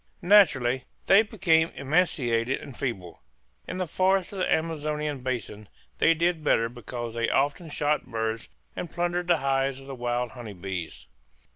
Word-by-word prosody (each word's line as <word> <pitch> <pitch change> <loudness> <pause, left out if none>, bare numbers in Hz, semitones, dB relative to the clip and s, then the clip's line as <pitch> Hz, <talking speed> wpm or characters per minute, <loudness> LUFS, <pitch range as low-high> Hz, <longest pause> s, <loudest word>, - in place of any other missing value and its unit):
Naturally 135 -11 +4 0.2
they 195 +2 +7
became 175 -7 +2
emaciated 135 -5 +1
and 140 -4 -10
feeble. 105 -11 -5 0.5
In - - -4
the 185 - -1
forests 185 +3 +1
of 195 - -5
the - - 0
Amazonian 150 -2 -1
basin 115 -5 -4 0.3
they 165 - +5
did 170 -1 0
better 115 -5 +2
because 120 -1 -6
they 115 0 0
often 145 +4 0
shot 150 0 0
birds 110 -1 -3 0.3
and 175 - -5
plundered 175 0 -1
the 175 -1 +4
hives 135 -1 0
of 135 - -13
the 135 - -7
wild 120 -1 -2
honey 120 -5 -8
bees. 90 -9 -6
135 Hz, 155 wpm, -27 LUFS, 120-165 Hz, 0.5 s, they